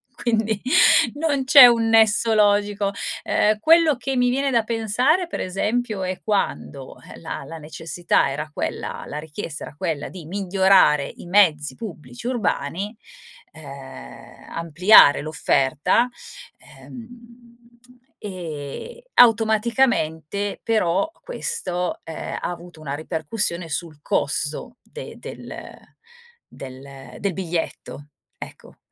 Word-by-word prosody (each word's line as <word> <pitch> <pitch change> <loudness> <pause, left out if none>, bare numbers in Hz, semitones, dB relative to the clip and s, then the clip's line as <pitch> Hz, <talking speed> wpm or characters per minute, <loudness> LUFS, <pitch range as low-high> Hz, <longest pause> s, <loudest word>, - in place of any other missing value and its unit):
quindi 220 -3 -1 0.5
non 290 -3 -1
c'è 260 -1 +9
un 230 -1 +2
nesso 225 0 +4
logico. 205 -1 +2 0.3
Ehm, 210 0 +1
quello 325 +4 +5
che 265 +2 -4
mi 250 -1 +2
viene 275 +2 0
da 235 -3 +2
pensare, 235 - 0
pre - - -4
esempio, 210 +3 -2
è 185 0 -3
quando, 145 -9 -3 0.2
eh, - - -12
la 165 - -6
la 165 0 -9
necessità 160 -1 -1
era 150 +2 -5
quella - - -5
la 150 - -6
richiesta 150 0 -7
era - - -12
quella 160 -4 -3
di 180 -4 -10
migliorare 190 -4 +3
i - - -11
mezzi 175 -6 +3
pubblici 155 - -10
urbani, 210 - -2 0.5
ehm, 135 - -12
ampliare 165 0 +5
l'offerta, 155 - +1 0.5
ehm, 235 0 -15 0.5
e 180 - -7
automaticamente 220 - +2
però 195 - +1
questo, 465 - -3
ehm, 160 -1 -7
ha - - -2
avuto 175 -2 -10
una 140 -2 -4
ripercussione 170 +3 -2
sul 155 0 -5
costo 145 - -2
de 485 - -10
del - - -9 0.9
del 135 -1 -11
del 200 -2 -2
biglietto, 165 -4 -5 0.3
ecco, - - -11
195 Hz, 110 wpm, -22 LUFS, 155-230 Hz, 0.9 s, c'è